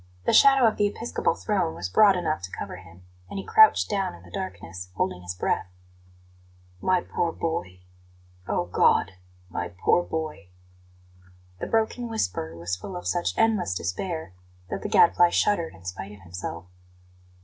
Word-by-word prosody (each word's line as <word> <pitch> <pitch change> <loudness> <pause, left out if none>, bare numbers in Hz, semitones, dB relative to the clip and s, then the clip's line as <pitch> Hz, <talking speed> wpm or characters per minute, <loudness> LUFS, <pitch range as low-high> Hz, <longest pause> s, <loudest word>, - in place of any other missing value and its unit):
The - - +2
shadow 270 -2 +7
of 220 - +2
the 205 - +3
episcopal 225 +3 -1
throne 185 -6 -1
was 90 - -4
broad 195 - +5
enough 165 - -1
to 95 0 -7
cover - - -6
him, 90 -1 -15 0.3
and - - -6
he 195 - -5
crouched 435 0 +6
down 195 - -1
in 85 - -16
the 90 - -15
darkness, 90 -1 -6
holding 90 -1 -1
his 90 0 -6
breath. 90 - -1 1.1
"My 185 -1 +2
poor 170 - -1
boy! 160 - -4 0.7
Oh, 90 - 0
God; 90 +1 +3 0.4
my 90 0 -4 0.2
poor - - +5
boy!" 155 - -5 1.1
The - - -4
broken 225 +2 0
whisper 90 - -2
was 85 +1 -2
full 140 - -8
of 180 - -6
such 175 -1 -1
endless 220 - +2
despair 95 - -4 0.4
that - - -3
the 210 - -4
Gadfly 175 -4 +5
shuddered 170 - +1
in 85 0 -17
spite 95 +2 -6
of 100 - -14
himself. 90 -2 -7
150 Hz, 160 wpm, -26 LUFS, -, 1.1 s, shadow